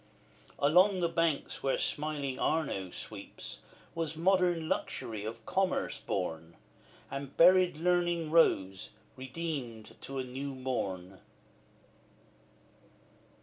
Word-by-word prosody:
Along 180 +7 +5
the 170 - +2
banks 165 -3 0
where 135 - +1
smiling 145 -3 -1
Arno 140 - 0
sweeps, - - -7 0.3
Was 165 -2 -3
modern 175 -2 +2
Luxury 110 -8 -3
of 115 0 -6
Commerce 190 -1 0
born, 80 -3 -3 0.6
And 140 0 -6
buried 180 -1 +6
Learning 175 -1 +1
rose, 95 - +3 0.2
redeemed 130 -5 -5
to 135 - -6
a 130 - -1
new 135 +2 -5
morn. 95 -8 -3
145 Hz, 100 wpm, -31 LUFS, 115-170 Hz, 0.6 s, buried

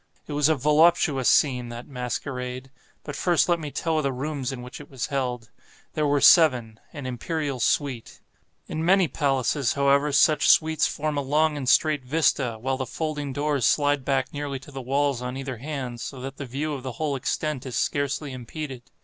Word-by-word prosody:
It 150 - -7
was 145 +1 +3
a 160 - +4
voluptuous 150 -1 +3
scene, 125 -5 +2
that 120 +1 -8
masquerade. 125 0 -5 0.3
But - - -6
first 175 -3 +2
let 175 -1 +2
me 150 -2 -5
tell 160 +2 -1
of 155 - 0
the 140 - 0
rooms 135 0 -3
in 125 -2 -7
which 125 +3 -9
it 145 - -13
was 135 -3 -4
held. 125 -4 -2 0.4
There 150 -1 0
were 145 0 +2
seven—an 130 -3 +3
imperial 140 +2 -3
suite. 130 -1 -1 0.5
In 160 - -4
many 185 +1 +4
palaces, 135 -3 0
however, 140 +1 +2
such 150 +2 +4
suites 160 -1 +4
form 150 0 -3
a - - +1
long 150 +3 +1
and 135 -3 -2
straight 150 +1 +3
vista, 130 -4 +1
while 130 +3 -1
the 130 -1 -4
folding 150 0 -3
doors 145 -1 -1
slide 145 +3 +2
back 135 0 -1
nearly 145 -1 -4
to 145 - -13
the 135 -1 -6
walls 135 0 0
on 125 +1 -4
either 135 -2 -5
hand, 130 -3 -5
so 135 - -6
that 135 +1 -7
the 140 - -6
view 145 +5 -3
of 135 - -5
the 130 -1 -6
whole 145 +2 -2
extent 140 +1 -2
is 125 - -5
scarcely 140 0 -1
impeded. 130 +1 -7
140 Hz, 190 wpm, -25 LUFS, 130-150 Hz, 0.5 s, a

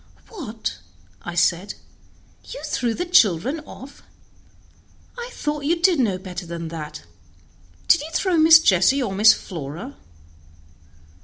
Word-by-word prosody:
"What!" 225 - -6 0.6
said 175 +2 0
I, - - -30
"you - - -8
threw 235 -2 -2
the 355 - -3
children 250 - +2
off? 275 +2 -12 1.1
I 480 0 -7
thought 295 -7 -4
you 335 +3 +1
did 350 -3 +3
know 210 -7 +1
better 185 -1 -8
than 170 -1 -6
that! 150 - -8 0.8
Did - - +5
you 305 - -7
throw 365 +1 0
Miss 320 0 +8
Jessie 210 - +3
or 200 -5 -3
Miss 210 +3 +6
Flora?" 170 - -8
225 Hz, 130 wpm, -22 LUFS, -, 1.1 s, Miss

